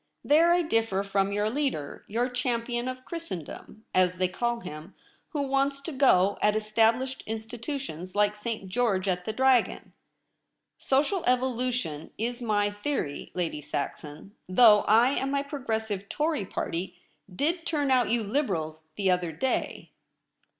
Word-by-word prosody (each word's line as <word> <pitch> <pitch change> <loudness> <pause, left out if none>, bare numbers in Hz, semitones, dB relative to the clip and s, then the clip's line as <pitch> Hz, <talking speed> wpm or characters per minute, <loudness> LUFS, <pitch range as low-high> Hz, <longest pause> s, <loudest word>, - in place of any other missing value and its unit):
There 325 +4 +5
I 350 0 +4
differ 225 -9 +1
from 195 0 0
your 205 +1 0
leader 235 - -2
— - - -37
your 235 +4 0
Champion 245 -1 -2
of 255 0 -6
Christendom, 220 - -7
as 180 -1 +3
they 185 0 +1
call 235 +5 -2
him 155 +1 -9 0.2
— - - -38
who 295 -5 -2
wants 275 0 +1
to 325 - -5
go 205 -9 +4
at 210 0 +3
established 225 +4 +1
Institutions 225 - -5
like 205 0 +3
St. 210 -2 -4
George 200 -2 0
at 180 -1 -1
the - - -1
dragon. 260 +1 +2 0.9
Social 300 +8 +1
evolution 250 - 0
Is 240 +3 -2
my 205 -3 +1
theory. 205 - -3
Lady 165 -4 -2
Saxon, 150 +6 -5 0.2
though 210 +1 +7
I 230 +5 +5
and 270 -1 -1
my 280 0 0
Progressive 220 -8 -3
Tory 300 - -1
Party 175 +3 -4 0.3
did 325 - -1
turn 290 -4 0
out 250 -4 +3
you 230 0 +1
Liberals 175 - -2
the 195 -2 +2
other 180 -2 0
day.' 250 +12 -2
225 Hz, 150 wpm, -27 LUFS, 195-265 Hz, 0.9 s, though